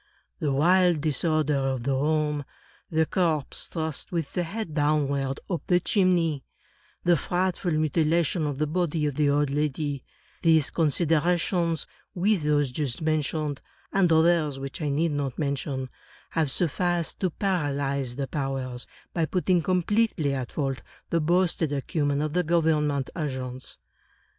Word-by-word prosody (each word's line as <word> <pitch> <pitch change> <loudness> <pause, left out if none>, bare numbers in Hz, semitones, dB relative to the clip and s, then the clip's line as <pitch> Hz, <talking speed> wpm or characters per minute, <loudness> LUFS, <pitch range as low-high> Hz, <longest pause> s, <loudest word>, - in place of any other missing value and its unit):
The 150 - 0
wild 175 +3 +4
disorder 155 -1 +1
of 135 -2 -1
the 135 +2 0
room; 150 +1 +1 0.5
the 160 0 +2
corpse 160 -5 0
thrust, 160 -3 -3
with 165 -5 -2
the 180 - 0
head 195 0 -4
down 150 -1 +2
ward, 135 -1 -2
up 175 -4 -2
the 180 -1 +4
chimney; 175 -7 +2 0.6
the 175 0 +5
frightful 180 +2 -1
mutilation 155 +1 +1
of 145 -2 -3
the 155 - +1
body 160 -1 0
of 145 - 0
the 145 +1 +2
old 145 0 +2
lady; 145 -1 -1 0.4
these 160 -4 +4
considerations, 165 +1 +1 0.3
with 195 +1 +2
those 145 -3 +1
just 135 -2 -2
mentioned, 155 -2 -1 0.3
and 190 -3 +3
others 160 -3 +3
which 135 +3 -6
I 150 - 0
need 155 +3 +1
not 140 -3 -2
mention, 140 -3 -2 0.4
have 160 -3 +1
sufficed 175 +3 0
to 185 - +1
paralyze 140 -8 -1
the 135 0 -3
powers, 135 -4 -3 0.3
by 165 -2 +1
putting 180 +1 +1
completely 185 -3 +1
at 130 -3 -4
fault 135 -3 -2 0.3
the 165 - +2
boasted 170 -1 +1
acumen 145 0 0
of 155 -1 -2
the 180 - +3
government 155 -4 +1
agents. 130 -5 -5
155 Hz, 145 wpm, -26 LUFS, 140-170 Hz, 0.6 s, the